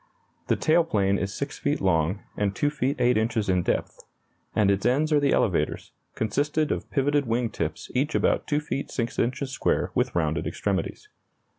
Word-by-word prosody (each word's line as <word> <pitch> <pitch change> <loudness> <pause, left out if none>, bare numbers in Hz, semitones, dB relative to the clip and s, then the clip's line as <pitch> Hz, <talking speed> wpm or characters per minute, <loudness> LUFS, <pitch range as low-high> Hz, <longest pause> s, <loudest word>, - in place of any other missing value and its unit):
The - - +3
tail 165 +2 +3
plane 100 -9 +1
is 95 +1 -2
6 140 0 -4
feet 145 +1 0
long 90 +1 +1
and 100 -1 -1
2 145 - +1
feet 140 -1 -1
8 120 -1 +3
inches 110 -1 0
in 90 -1 +3
depth; - - -2 0.6
at 100 -2 +4
its 100 0 0
ends 145 +7 +2
are 150 - +5
the 140 -1 +2
elevators, - - 0 0.2
consisting 145 +7 0
of - - -3
pivoted 145 -1 +1
wing 115 0 0
tips 75 0 -4
each 140 +5 0
about - - +1
2 150 - +1
feet 140 -2 -4
6 120 -2 -3
inches 130 +2 -1
square - - 0
with - - 0
rounded - - 0
extremities. 425 - -2
125 Hz, 180 wpm, -26 LUFS, 105-145 Hz, 0.6 s, are